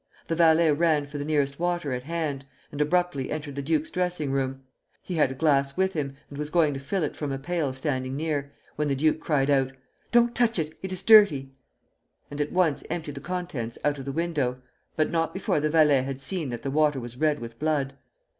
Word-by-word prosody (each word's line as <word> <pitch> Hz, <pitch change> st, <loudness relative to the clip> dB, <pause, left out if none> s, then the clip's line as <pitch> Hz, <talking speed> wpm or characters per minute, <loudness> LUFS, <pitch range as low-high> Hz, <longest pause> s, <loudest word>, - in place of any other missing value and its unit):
The 165 Hz, -, +1 dB
valet 165 Hz, -1 st, +5 dB
ran 155 Hz, -1 st, +2 dB
for 145 Hz, 0 st, -7 dB
the -, -, -2 dB
nearest 145 Hz, -2 st, 0 dB
water 175 Hz, -5 st, -1 dB
at 125 Hz, 0 st, -4 dB
hand, 155 Hz, -4 st, -2 dB, 0.3 s
and 145 Hz, -, -3 dB
abruptly 150 Hz, -3 st, +1 dB
entered 150 Hz, -2 st, -4 dB
the 140 Hz, -, -4 dB
duke's 155 Hz, +2 st, 0 dB
dressing 180 Hz, -6 st, -1 dB
room. 135 Hz, 0 st, -2 dB, 0.4 s
He 185 Hz, -, -5 dB
had 150 Hz, -5 st, +3 dB
a 130 Hz, -, -5 dB
glass 140 Hz, -1 st, +2 dB
with 190 Hz, 0 st, +2 dB
him, 140 Hz, -3 st, -3 dB
and 140 Hz, -, -9 dB
was 150 Hz, 0 st, -3 dB
going 155 Hz, -3 st, +3 dB
to 135 Hz, -, -4 dB
fill 165 Hz, +7 st, -2 dB
it 150 Hz, -, -2 dB
from 145 Hz, -2 st, -3 dB
a 135 Hz, -, -2 dB
pail 155 Hz, 0 st, -1 dB
standing 130 Hz, -1 st, -2 dB
near, 145 Hz, -2 st, -2 dB, 0.3 s
when 150 Hz, 0 st, 0 dB
the 140 Hz, -, +1 dB
duke 155 Hz, +3 st, +2 dB
cried 145 Hz, -3 st, +1 dB
out: 135 Hz, -1 st, +2 dB, 0.4 s
"Don't 240 Hz, 0 st, +4 dB
touch 235 Hz, -3 st, +2 dB
it; 155 Hz, -1 st, -2 dB
it 190 Hz, -, -5 dB
is 185 Hz, 0 st, -3 dB
dirty;" 190 Hz, -12 st, +6 dB, 0.8 s
and 145 Hz, +1 st, -3 dB
at 145 Hz, -, -2 dB
once 180 Hz, -5 st, +2 dB
emptied 155 Hz, -4 st, -4 dB
the 140 Hz, -, -8 dB
contents 160 Hz, -10 st, -4 dB
out 145 Hz, -1 st, +1 dB
of 135 Hz, -, -7 dB
the 140 Hz, -, -3 dB
window, 145 Hz, -5 st, -1 dB, 0.4 s
but 155 Hz, -1 st, +1 dB
not 165 Hz, +1 st, 0 dB
before 190 Hz, -5 st, 0 dB
the 155 Hz, +1 st, 0 dB
valet 150 Hz, -4 st, +5 dB
had 135 Hz, 0 st, -4 dB
seen 155 Hz, +1 st, -3 dB
that 120 Hz, -1 st, -5 dB
the 135 Hz, -, -2 dB
water 150 Hz, -1 st, +2 dB
was 120 Hz, 0 st, -8 dB
red 150 Hz, +1 st, +2 dB
with 115 Hz, 0 st, -9 dB
blood. 150 Hz, -3 st, 0 dB
150 Hz, 220 wpm, -26 LUFS, 135-165 Hz, 0.8 s, dirty